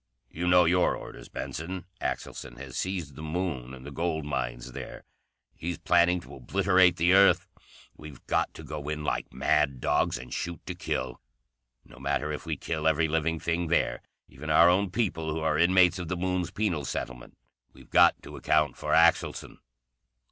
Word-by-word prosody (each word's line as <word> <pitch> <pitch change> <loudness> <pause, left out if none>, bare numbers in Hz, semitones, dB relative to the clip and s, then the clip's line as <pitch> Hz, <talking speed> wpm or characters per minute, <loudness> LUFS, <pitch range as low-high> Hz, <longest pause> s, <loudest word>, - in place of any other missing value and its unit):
"You 90 +3 -3
know 90 0 +6
your 90 +2 +3
orders, - - -10
Benson? 90 +3 -5 0.2
Axelson 60 -2 -5
has 65 -1 -9
seized 90 -7 -3
the 75 - -9
Moon 80 -6 -3
and 65 -1 -11
the - - -7
gold 80 -2 -2
mines - - -3
there. - - -8 0.5
He's 85 0 -5
planning 90 +1 +3
to - - -13
obliterate 90 +5 +3
the 85 +2 +3
Earth. 100 0 +5 0.5
We've 75 -3 -12
got - - 0
to - - -9
go 75 -1 -6
in 75 0 -3
like - - -2
mad 70 0 +1
dogs - - +1
and 60 +1 -9
shoot 85 -3 -4
to - - -4
kill. 65 0 -4 0.6
No 65 - -16
matter 70 +2 -1
if 75 +2 -6
we 80 -3 -2
kill 80 +1 -2
every 80 +1 +3
living 80 +1 0
thing 85 +1 -1
there, 85 - +1 0.3
even 75 +4 -9
our 85 +2 +6
own 95 +2 +2
people 90 -6 -1
who 80 +1 -3
are 80 -1 +1
inmates 90 0 +4
of 90 - -5
the 90 - -2
Moon's 90 -1 -1
penal 90 -9 -1
settlement, 65 -2 -6 0.3
we've - - -18
got - - +6
to - - -10
account 75 -1 +1
for - - -2
Axelson." - - +2
80 Hz, 175 wpm, -28 LUFS, 75-90 Hz, 0.6 s, know